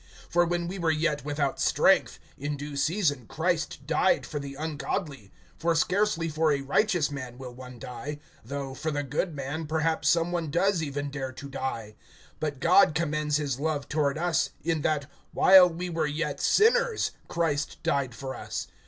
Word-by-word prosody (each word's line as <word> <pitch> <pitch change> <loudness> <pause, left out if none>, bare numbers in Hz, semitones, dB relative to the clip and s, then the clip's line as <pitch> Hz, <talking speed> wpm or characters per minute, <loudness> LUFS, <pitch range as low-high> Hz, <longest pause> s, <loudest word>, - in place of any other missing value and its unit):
(6)For 175 0 +4
when 175 -1 -1
we 190 +2 -5
were 170 -2 +1
yet 155 -2 0
without 145 -1 -1
strength, - - +3 0.2
in 145 +1 -4
due 145 0 -6
season 145 - 0
Christ 160 -4 -1
died 185 +5 +2
for 150 - -4
the 140 -1 -7
ungodly. 150 - -4 0.3
(7)For 165 0 +1
scarcely 185 -1 +1
for 155 0 +1
a 140 -1 +1
righteous 160 +2 +1
man 130 -4 -6
will 125 -2 -8
one 125 0 -10
die; 135 +4 -6 0.3
though, 135 +2 -5
for 155 +4 -3
the 145 -1 -1
good 150 +5 -2
man, 145 +3 -4
perhaps 160 +1 +1
some 170 0 +2
one 170 -3 -2
does 175 +3 +2
even 145 -1 -3
dare 135 -2 -4
to 140 - -8
die. 125 -6 -4 0.5
(8)But 150 -3 -2
God 170 +1 +5
commends 150 -2 0
his 140 -4 -2
love 150 -2 -1
toward 150 -2 0
us, 175 0 +1
in 165 -2 0
that, 150 -1 0 0.3
while 185 -1 +8
we 175 +2 -4
were 165 -3 -1
yet 150 0 -2
sinners, 470 +1 +3 0.2
Christ 155 -3 -1
died 135 -4 0
for 130 +3 -5
us. - - -5
150 Hz, 175 wpm, -27 LUFS, 140-170 Hz, 0.5 s, while